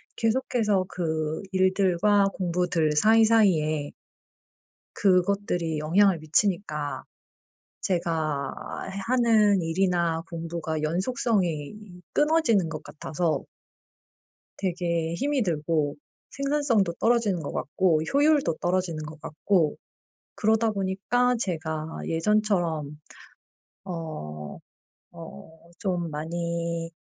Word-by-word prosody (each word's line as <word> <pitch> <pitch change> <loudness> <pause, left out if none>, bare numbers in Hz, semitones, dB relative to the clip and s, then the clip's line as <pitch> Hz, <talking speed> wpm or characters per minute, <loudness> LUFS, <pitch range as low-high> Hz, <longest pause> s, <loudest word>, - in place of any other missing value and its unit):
계속해서 225 -4 +1
그 160 0 -2
일들과 190 +1 +3
공부들 175 -3 0
사이사이에 190 -7 +3 1.0
그것들이 185 -4 +1
영향을 180 +4 +3
미치니까 155 -2 0 0.8
제가 160 -6 -1 0.5
하는 220 -6 +4
일이나 170 -1 0
공부가 165 -2 -4
연속성이 180 - 0 0.4
끊어지는 295 - +3
것 155 -1 -6
같아서 155 -1 -2 1.2
되게 170 -3 -1
힘이 275 +5 0
들고 150 -4 -1 0.3
생산성도 275 - +1
떨어지는 225 -7 +2
것 145 - -5
같고 160 +1 +1
효율도 285 - +3
떨어지는 175 -3 -1
것 150 0 -10
같고 155 0 0 0.6
그러다 220 +1 +2
보니까 205 +6 +1
제가 160 -6 -3 0.2
예전처럼 165 -5 0 0.9
어 75 - -6 0.5
어 160 - -12 0.2
좀 175 -5 -1
많이 170 +1 -3
175 Hz, 205 characters per minute, -26 LUFS, 160-205 Hz, 1.2 s, 하는